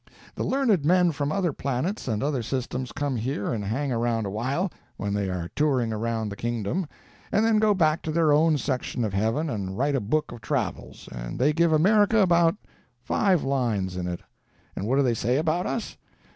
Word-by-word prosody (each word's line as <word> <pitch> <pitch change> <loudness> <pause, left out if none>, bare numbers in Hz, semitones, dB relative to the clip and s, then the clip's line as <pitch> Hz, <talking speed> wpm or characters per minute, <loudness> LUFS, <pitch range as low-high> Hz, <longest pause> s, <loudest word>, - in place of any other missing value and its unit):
The - - -3
learned 245 - +2
men 180 +2 +4
from 145 -1 -2
other 175 -3 0
planets 140 - -2
and 110 -1 -1
other 140 -3 0
systems 130 +1 -3
come 145 -3 -2
here 115 -1 -2
and 105 -3 -3
hang 130 +8 -2
around 115 -2 0
a 100 - -3
while, 135 - -1 0.3
when 100 0 -2
they 100 -2 -1
are 90 -2 -4
touring 130 -7 +1
around 110 0 -2
the 100 - -6
Kingdom, 120 - -2 0.4
and 215 +2 +3
then 225 -1 +4
go 210 -1 +3
back 160 -3 +2
to 160 - -3
their 160 -2 +3
own 155 +1 +4
section 125 -2 -2
of 105 - -3
heaven 115 +11 0
and 100 -7 -4
write 140 +3 +1
a 135 - +2
book 150 +10 -1
of 120 -2 -9
travels, - - -3
and - - -6
they 145 +4 +3
give 170 +1 +3
America 205 +7 +4
about 170 -3 +4 0.5
five 185 - +2
lines 115 -9 -1
in 90 -1 -3
it. 90 -1 -4 0.5
And 100 - -3
what 130 - +2
do 140 - +4
they 125 -3 +2
say 120 +3 0
about 160 +3 0
us? 230 - -4
135 Hz, 200 wpm, -26 LUFS, 110-165 Hz, 0.5 s, men